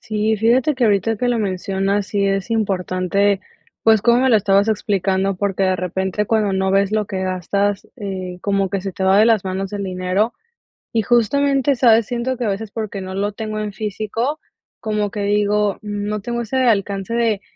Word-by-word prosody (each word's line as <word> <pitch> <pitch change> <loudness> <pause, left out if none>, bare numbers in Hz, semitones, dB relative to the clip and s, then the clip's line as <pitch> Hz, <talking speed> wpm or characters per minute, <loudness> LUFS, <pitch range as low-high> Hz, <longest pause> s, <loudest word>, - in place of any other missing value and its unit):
Sí, 215 0 0
fíjate 245 +7 +2
que 255 - +1
ahorita 215 +1 +2
que 245 +4 -1
lo 240 -1 +1
mencionas 195 0 -1
sí 200 -1 0
es 195 +2 -1
importante, 195 -2 0 0.4
pues, 220 -1 +5
cómo 235 +1 +4
me 260 - +3
lo 225 - +6
estabas 200 +1 +3
explicando, 195 -2 0
porque 195 0 0
de 185 0 +2
repente 190 +3 -2
cuando 215 -2 +1
no 190 0 0
ves 195 +1 +2
lo 215 -1 0
que 190 -1 -4
gastas, 195 +2 -1
eh, 190 -5 -5
como 195 -1 0
que 195 - -1
se 195 0 -5
te 190 - -3
va 190 +1 +5
de 215 - +6
las 225 -4 +3
manos 190 +1 -3
el 200 -1 -3
dinero, 185 +4 -1 0.6
y 225 - +2
justamente, 275 +5 +2
¿sabes?, 230 -3 +4
siento 245 +1 -2
que 245 - -2
a 210 - +1
veces 205 +2 -4
porque 210 -3 -5
no 190 0 -6
lo 205 +2 -2
tengo 215 0 -4
en 210 -1 -4
físico 220 +7 -3 0.4
como 210 -2 -1
que 210 - -4
digo, 205 0 +1
no 210 0 -3
tengo 235 +3 -3
ese 235 +3 -3
alcance 205 -4 +1
de 230 -4 +1
205 Hz, 195 wpm, -20 LUFS, 195-225 Hz, 0.6 s, lo